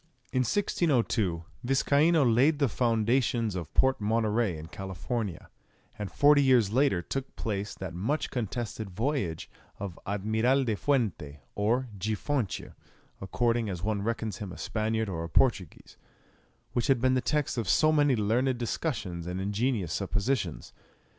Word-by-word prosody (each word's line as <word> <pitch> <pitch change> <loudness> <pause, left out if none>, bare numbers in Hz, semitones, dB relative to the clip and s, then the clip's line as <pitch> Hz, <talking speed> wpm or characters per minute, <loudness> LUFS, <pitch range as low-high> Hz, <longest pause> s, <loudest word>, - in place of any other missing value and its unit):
In 130 - +2
1602 120 - +1 0.2
Viscaino 145 +5 +3
laid 130 +6 +4
the 140 -1 +2
foundations 115 -1 +1
of 90 -4 -5
Port 130 -3 +3
Monterey 110 -3 +1
in 75 - -8
California, 95 +2 -4 0.5
and 105 -2 -4
forty 145 0 +5
years 125 -7 +4
later 130 -9 +2
took 135 +7 -5
place 105 -2 -3
that 95 -3 -6
much 115 - -2
contested 115 -3 -4
voyage 105 - -2 0.3
of 95 -4 -6
Admiral 110 +7 +1
De 115 -4 0
Fuente, 100 - -1
or 120 +5 +1
De 105 +3 -2
Fonte 125 -2 -2 0.5
according 115 +3 0
as 90 -2 -5
one 105 -1 0
reckons 110 -2 -2
him 100 -2 -6
a - - -9
Spaniard 110 0 -1
or 85 -4 -3
a 85 - -6
Portuguese, 95 - 0 0.8
which 120 - 0
has 135 - +4
been 130 +2 +2
the 130 - +2
text 150 +3 0
of 115 -8 -2
so 155 - +4
many 145 -3 +3
learned 120 +4 +1
discussions 105 - -3
and 90 +1 -3
ingenious 105 - -1
suppositions. 105 - -2
115 Hz, 145 wpm, -29 LUFS, 95-130 Hz, 0.8 s, forty